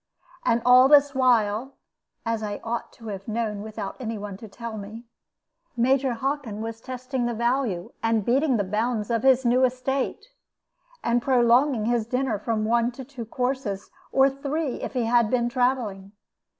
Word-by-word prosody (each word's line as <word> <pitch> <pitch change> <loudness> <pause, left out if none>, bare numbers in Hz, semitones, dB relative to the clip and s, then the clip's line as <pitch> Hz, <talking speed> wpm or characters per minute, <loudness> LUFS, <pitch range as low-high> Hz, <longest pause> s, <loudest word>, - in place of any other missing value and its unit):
And 235 0 +1
all 250 +1 +8
this 285 -1 +6
while 250 -1 +2 0.5
(as 230 -1 -1
I 205 -1 -4
ought 235 +1 -3
to 225 -2 -10
have 195 -1 -7
known, 215 -2 -2
without 215 -2 -6
any 225 -3 -4
one 205 -1 -6
to 220 - -10
tell 230 +2 -7
me) 215 +3 -8 0.7
Major 260 +2 +2
Hockin 260 -3 -3
was 225 0 -5
testing 255 0 -3
the 240 - -2
value 235 -6 -1
and 225 -2 +1
beating 265 +1 +2
the 205 - +1
bounds 215 +3 -1
of 230 -1 +1
his 265 0 +4
new 250 +2 +4
estate, 255 +1 -1 0.8
and 235 +1 +2
prolonging 245 -1 +3
his 235 -1 0
dinner 250 -3 -1
from 215 0 -1
one 235 +2 +2
to 265 +1 -9
two 255 -3 -8
courses, 250 -4 -3 0.2
or 270 0 +5
three 275 +1 -3
if - - -5
he 250 -2 0
had 235 -1 +3
been 240 -1 +1
travelling. 240 -6 -1
235 Hz, 165 wpm, -25 LUFS, 220-260 Hz, 0.8 s, all